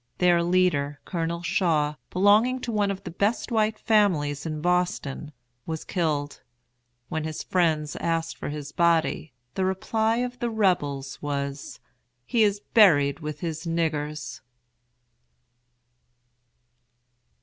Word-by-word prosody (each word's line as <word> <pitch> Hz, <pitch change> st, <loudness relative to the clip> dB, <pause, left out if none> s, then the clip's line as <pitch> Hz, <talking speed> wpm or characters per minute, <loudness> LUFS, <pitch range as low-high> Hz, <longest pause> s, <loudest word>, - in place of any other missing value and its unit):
Their 175 Hz, -1 st, +4 dB
leader, 170 Hz, -5 st, +1 dB
COLONEL 170 Hz, 0 st, -3 dB
SHAW, 160 Hz, -4 st, +1 dB, 0.2 s
belonging 210 Hz, +7 st, +4 dB
to 240 Hz, -, -3 dB
one 205 Hz, -2 st, +1 dB
of 195 Hz, 0 st, -4 dB
the -, -, -6 dB
best 205 Hz, +8 st, -1 dB
white 215 Hz, -1 st, +1 dB
families 165 Hz, -9 st, +1 dB
in 155 Hz, -1 st, -4 dB
Boston, 175 Hz, -4 st, -1 dB, 0.4 s
was 160 Hz, -1 st, -4 dB
killed. 150 Hz, -5 st, -2 dB, 0.7 s
When 160 Hz, -1 st, -2 dB
his 155 Hz, 0 st, -4 dB
friends 160 Hz, -4 st, 0 dB
asked 165 Hz, -1 st, -1 dB
for -, -, -6 dB
his 145 Hz, -1 st, -6 dB
body, 165 Hz, -2 st, +1 dB, 0.2 s
the 190 Hz, -, -1 dB
reply 220 Hz, +4 st, 0 dB
of 250 Hz, 0 st, -3 dB
the 240 Hz, -, -1 dB
Rebels 145 Hz, -11 st, 0 dB
was, 140 Hz, -1 st, -4 dB, 0.5 s
"He 230 Hz, -, +1 dB
is 205 Hz, -1 st, +2 dB
buried 150 Hz, -11 st, +5 dB
with 150 Hz, -2 st, -6 dB
his 165 Hz, 0 st, -4 dB
niggers." 150 Hz, -4 st, -2 dB
170 Hz, 120 wpm, -25 LUFS, 150-200 Hz, 0.7 s, buried